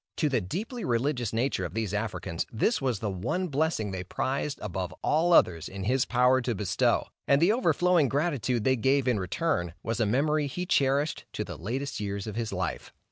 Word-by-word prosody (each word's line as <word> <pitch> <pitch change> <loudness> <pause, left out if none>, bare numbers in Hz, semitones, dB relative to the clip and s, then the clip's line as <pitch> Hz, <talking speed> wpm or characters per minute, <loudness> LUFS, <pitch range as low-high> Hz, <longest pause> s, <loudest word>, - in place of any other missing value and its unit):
To 150 - +2
the 125 -5 +1
deeply 215 - -4
religious 120 -1 0
nature 120 +5 0
of - - -5
these 110 -3 -2
Africans, 95 -6 -3
this 145 - +1
was 130 -4 0
the 105 +1 -3
one 120 - -2
blessing 145 -8 0
they 95 -1 -4
prized 135 +9 -2
above 90 -3 -4
all 165 +3 +2
others 85 - +4
in 95 0 -6
his 125 +5 +2
power 125 +1 +3
to 120 -1 -1
bestow, 95 -1 +1 0.2
and 140 - +5
the 170 +6 +4
overflowing 175 - +3
gratitude 135 -6 0
they 130 +2 +3
gave 135 +2 +2
in 120 -5 +2
return, 90 - -1
was 115 0 -2
a 110 - +2
memory 145 +6 +1
he 180 +6 -4
cherished 140 -1 +1
to - - -2
the - - -7
latest 130 +10 -4
years 100 -1 -3
of 110 -2 -6
his 115 -1 -2
life. 95 -2 -3
125 Hz, 195 wpm, -28 LUFS, 105-145 Hz, 0.2 s, and